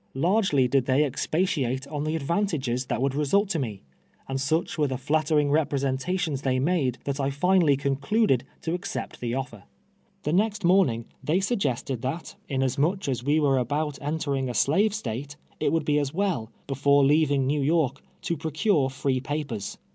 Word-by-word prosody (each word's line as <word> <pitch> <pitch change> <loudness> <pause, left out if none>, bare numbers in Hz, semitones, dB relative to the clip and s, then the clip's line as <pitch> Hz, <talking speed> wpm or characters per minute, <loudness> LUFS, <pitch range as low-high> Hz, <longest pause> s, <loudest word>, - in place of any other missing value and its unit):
Largely 165 - +2
did 130 0 +1
tliey 135 +3 +4
expatiate 140 -2 -1
on 150 0 -3
the 155 +1 -1
advantages 140 - -1
that 120 - -1
would 135 -1 +1
result 150 +8 +2
to 170 -6 0
me, 110 - -4 0.4
and 135 0 -2
such 160 +5 0
wore 150 -2 +1
the 130 -1 -2
flattering 150 +1 +1
representations 145 +2 0
they 130 -2 +1
made, 135 -3 +1
that 140 0 -3
I 135 0 +1
finally 160 0 +3
concluded 140 - +1 0.2
to 165 +1 -1
accej^t 180 +3 -5
the 120 0 -2
offer. 115 -6 -5 0.6
Tlic 150 - -1
next 205 +2 +1
morning 170 -11 +3 0.2
they 165 +5 +2
suggested 140 - -1
that, 140 +7 -4 0.2
inasmuch 140 +7 0
as 125 -3 -2
we 145 +4 +2
were 140 -3 +3
about 145 +4 -2
entering 140 -3 -1
a 120 - -4
slave 200 - +3
State, 140 - -5 0.2
it - - +1
would 160 -2 0
be 150 0 +2
well, 180 - -1 0.2
before 140 +1 +3
leaving 145 -2 +3
Xew 145 0 +1
York, 145 -2 +1 0.2
to 170 - -1
procure 155 -1 +1
free 135 0 -1
pa 145 +4 -2
pers. 105 -6 -5
145 Hz, 170 wpm, -26 LUFS, 135-160 Hz, 0.6 s, tliey